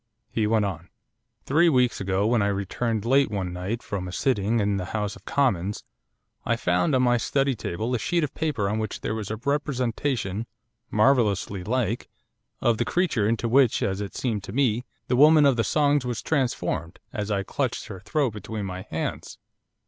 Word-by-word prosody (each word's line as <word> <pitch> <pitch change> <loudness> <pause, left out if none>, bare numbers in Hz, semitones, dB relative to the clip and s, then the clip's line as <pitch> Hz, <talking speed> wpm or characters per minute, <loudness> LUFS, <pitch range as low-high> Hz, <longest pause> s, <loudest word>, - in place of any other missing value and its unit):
He 110 -2 +1
went 110 -1 +2
on. 85 -3 -5 0.6
'Three 165 +5 +4
weeks 125 -7 +2
ago, 95 +1 0
when 115 0 +3
I 100 - +2
returned 100 +3 -1
late 135 +3 +4
one 95 -4 -3
night 95 +7 -4
from 95 -2 -4
a - - -6
sitting 115 0 +1
in 100 -1 +1
the 90 - -3
House 105 -1 -2
of - - -16
Commons, 105 -8 0 0.6
I 115 - +1
found, 90 +4 +1
on 130 - +3
my 120 -1 +4
study 135 +3 +1
table, 110 +2 -3
a 125 - +1
sheet 170 +8 0
of 150 - -2
paper 150 -11 -1
on 105 +2 -1
which 110 -1 -4
there - - -2
was 110 -3 -4
a 110 - -2
representation 125 -4 -1 0.4
marvellously 105 -5 +2
like! 115 +1 -1 0.5
of 115 -2 +2
the - - +3
creature 140 - +1
into 115 +1 0
which, 125 0 +4
as 95 +1 -1
it 100 - -6
seemed 110 -6 -2
to - - -7
me, 125 -1 +1 0.2
the 125 - +1
woman 150 +3 +7
of 140 -2 +5
the 115 - +1
songs 145 0 +2
was 120 -3 -3
transformed 130 - -1 0.2
as 105 -1 -3
I 100 -2 0
clutched 130 +3 -2
her 100 -5 -8
throat 120 +5 0
between 105 0 -5
my 95 -1 -5
hands. - - -4
115 Hz, 190 wpm, -25 LUFS, 100-130 Hz, 0.6 s, woman